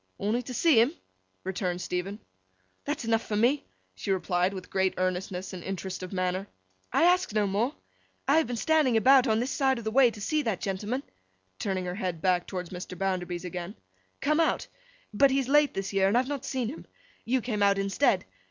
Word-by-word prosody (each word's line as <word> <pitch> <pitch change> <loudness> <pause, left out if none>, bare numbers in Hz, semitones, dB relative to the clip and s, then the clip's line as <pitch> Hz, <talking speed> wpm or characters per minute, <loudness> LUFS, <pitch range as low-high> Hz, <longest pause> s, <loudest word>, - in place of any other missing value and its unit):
'Only 215 +5 0
to 250 +1 -7
see 305 -7 +5
'em?' 270 +9 +1 0.5
returned 180 -2 -2
Stephen. 180 +3 -3 0.7
'That's - - -3
enough 225 0 +2
for 210 - -4
me,' 245 +7 +2 0.3
she 95 - -7
replied, 185 -1 +1
with 190 -2 -8
great 190 -1 +1
earnestness 185 +1 -2
and 180 -2 -7
interest 190 -1 -5
of 185 - -6
manner. 185 +1 -1 0.4
'I - - +3
ask 360 - +3
no 210 -1 +2
more! 215 +8 0 0.5
I 285 - +5
have 320 - 0
been 245 - -3
standing 280 -1 +3
about, 260 +3 +6
on 220 -1 +2
this 250 +4 -1
side 265 -2 +2
of 235 - -6
the 220 - -2
way, 255 +1 +6
to 225 - -10
see 305 +9 0
that 220 -9 -1
gentleman,' 210 +7 -3 0.6
turning 190 -2 -2
her 180 - -3
head 180 -3 -3
back 180 +1 +1
towards 180 -3 -5
Mr. 180 0 -7
Bounderby's 180 -1 -2
again, 180 +2 -5 0.5
'come 305 +2 +2
out. 325 - +2 0.5
But, 275 +7 +5
he's 270 -1 +1
late 295 +1 +4
this 195 +1 -3
year, 195 -1 +3
and 205 +5 +3
I - - +6
have 260 - -6
not 280 -2 -4
seen 255 -4 -2
him. 290 - -9 0.4
You 255 +3 +1
came 220 -4 -3
out 200 0 +4
instead. 195 +8 +2
205 Hz, 205 wpm, -28 LUFS, 185-255 Hz, 0.7 s, about